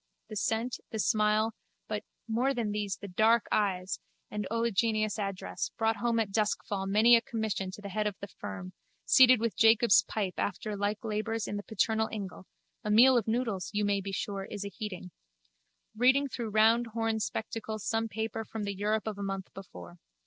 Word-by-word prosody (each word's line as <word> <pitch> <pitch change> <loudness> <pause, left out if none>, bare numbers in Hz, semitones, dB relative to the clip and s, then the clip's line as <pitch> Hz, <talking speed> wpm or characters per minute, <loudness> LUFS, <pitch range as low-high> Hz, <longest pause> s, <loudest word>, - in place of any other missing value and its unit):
The 215 - -6
scent, 225 +3 -1
the 220 - -4
smile, 215 +1 +2 0.3
but, 210 0 -3 0.2
more 250 +5 +1
than 225 -3 -1
these, 205 -2 -2
the 200 - -8
dark 220 +5 +3
eyes 190 -3 0 0.3
and 210 -2 -3
oleaginous 225 -1 0
address, 195 -2 -3
brought 225 0 +1
home 235 +1 +1
at 215 -3 -1
duskfall 205 -2 -1
many 220 +4 +6
a 230 - +4
commission 220 -5 -3
to 195 +2 -9
the 200 - -6
head 210 +2 -1
of 205 - -3
the 200 - -6
firm, 200 -2 -8 0.3
seated 255 -2 +7
with 230 -1 -1
Jacob's 225 -3 +6
pipe 195 -1 -3
after 205 +2 -2
like 205 +2 -2
labours 220 +1 -2
in - - -3
the 205 - -3
paternal 220 +1 0
ingle 195 -3 -6 0.4
(a 210 - -3
meal 245 +5 +7
of 230 -4 +1
noodles, 220 -5 -1
you 210 0 +1
may 200 -1 +1
be 195 +1 -5
sure, 195 0 -3
is 205 0 -6
aheating), 200 -3 -6 0.8
reading 260 +5 +4
through 235 -4 -4
round 225 +3 +4
horned 225 -1 0
spectacles 220 -1 -4
some 225 0 0
paper 220 0 -3
from 220 -1 -6
the 200 0 -2
Europe 210 +2 -1
of 215 -2 -4
a - - -3
month 195 -1 -4
before. 90 - -11
215 Hz, 185 wpm, -30 LUFS, 200-225 Hz, 0.8 s, seated